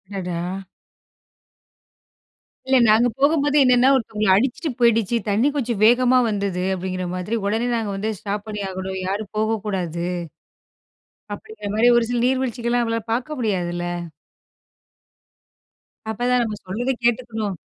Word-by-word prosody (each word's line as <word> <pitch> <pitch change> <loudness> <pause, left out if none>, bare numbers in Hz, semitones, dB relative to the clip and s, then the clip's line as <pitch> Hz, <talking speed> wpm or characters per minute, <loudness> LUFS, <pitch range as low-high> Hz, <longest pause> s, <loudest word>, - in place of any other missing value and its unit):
அடடா! 175 -2 -3 2.2
இல்ல. 265 0 +4
நாங்க 220 +3 +5
போகும்போது 290 0 +3
என்னன்னா, 250 0 +5
ஒருத்தவங்கள 215 -5 0
அடிச்சுட்டு 265 - 0
போயிடுச்சு. 235 -1 +3
தண்ணி 225 +8 +3
கொஞ்சம் 235 -7 -2
வேகமா 250 +2 +5
வந்தது. 200 -3 -2
அப்டிங்கிற 185 0 -4
மாதிரி 185 +5 -3
உடனே 225 +4 0
நாங்க 225 -3 -2
வந்து 215 +3 -2
ஸ்டாப் 205 +1 -4
பண்ணி 210 -1 -4
ஆகணும். 190 0 -5
யாரும் 200 +1 -3
போகக்கூடாது. 195 -6 -2 1.3
அப்டிங்கிற 210 -1 -8
மாரி. 230 +3 +5
ஒரு 235 - +2
சில 240 -1 0
நீர்வீழ்ச்சிகலாம் 245 -2 0
நம்மளால 230 -1 -2
பார்க்க 260 +5 -3
முடியாதுல்ல. 175 -6 -1 2.3
அப்ப 220 - -5
தான் 250 -1 +3
நம்ம 215 -2 -4
சொல்றத 230 +8 -2
கேட்டுக்கணும். 225 -5 -1
220 Hz, 120 wpm, -22 LUFS, 195-245 Hz, 2.3 s, நாங்க